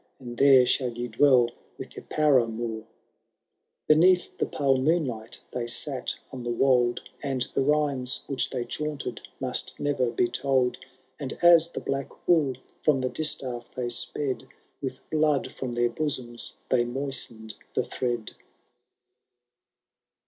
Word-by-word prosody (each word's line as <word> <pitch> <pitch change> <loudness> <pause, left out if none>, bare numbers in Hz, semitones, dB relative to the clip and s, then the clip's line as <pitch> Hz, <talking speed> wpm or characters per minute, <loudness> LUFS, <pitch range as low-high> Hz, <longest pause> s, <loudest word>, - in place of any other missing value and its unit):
And 120 -2 -8
there 135 -1 +7
shall 125 0 +1
ye 120 0 -2
dweU 120 0 +4 0.3
with - - -9
your - - -9
panunoui/* 115 -6 +1 1.0
Beneath 175 +4 +4
the - - +1
pale 135 -2 +2
moonlight 130 -6 -1
they 120 -1 -2
sate 130 +2 -3
on 130 - -6
the 120 - -4
wold. 120 0 +2 0.2
And 135 -3 -1
the - - +1
rhymes 140 -3 +1
which 135 - -1
they 125 -3 -3
chaunted 150 -6 -4 0.2
must 130 -1 -2
never 140 -4 +1
be 120 +1 +1
told; 130 +1 +1 0.4
And 140 -2 -5
as 170 -1 +7
the 170 - -6
black 135 0 -5
wool 150 -7 +3 0.3
from 150 -3 +3
the 130 -1 -1
distaff 125 -6 -3
they 125 -1 -2
sped. 130 +2 -1 0.3
With 135 -2 -6
blood 150 -3 +2
from 125 -2 -5
their 120 0 +1
bosoms 125 -4 -3
they 125 -2 +3
moistened 120 -3 -3 0.2
the - - +2
thread. 120 -3 -3
130 Hz, 135 wpm, -27 LUFS, 120-145 Hz, 1.0 s, there